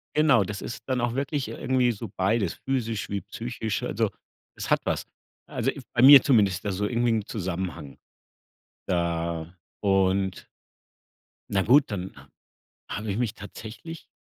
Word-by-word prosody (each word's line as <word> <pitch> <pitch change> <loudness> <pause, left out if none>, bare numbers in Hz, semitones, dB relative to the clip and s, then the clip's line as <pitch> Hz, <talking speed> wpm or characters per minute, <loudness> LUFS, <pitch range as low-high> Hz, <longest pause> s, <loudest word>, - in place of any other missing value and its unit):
genau, 150 -9 +5
das 105 +2 -5
ist 115 - -6
dann 130 -2 0
auch 120 -1 0
wirklich, 140 0 -1
äh, - - -6
irgendwie 125 -1 +2
so 110 -1 -6
beides, 95 -1 +1
physisch 115 -5 -1
wie 100 -1 -2
psychisch 115 -2 -4
also - - 0 0.5
es - - -6
hat - - +5
was. - - -1 0.4
Also - - -1
i - - -9
bei 120 - +2
mir 140 +1 +11
zumindest 100 - +3
also 100 +1 -1
irgendwie 120 0 +1
'n 110 -3 0
Zusammenhang. 90 - -4 0.9
Da 85 -1 -1 0.3
und 95 -1 +1 1.0
na 95 - +2
gut, 130 +5 +4
dann 95 -1 -4
ha - - -14 0.6
habe 105 0 -3
ich 100 - -2
mich 120 -3 0
tatsächlich 110 +10 -9
105 Hz, 150 wpm, -26 LUFS, 95-120 Hz, 1.0 s, mir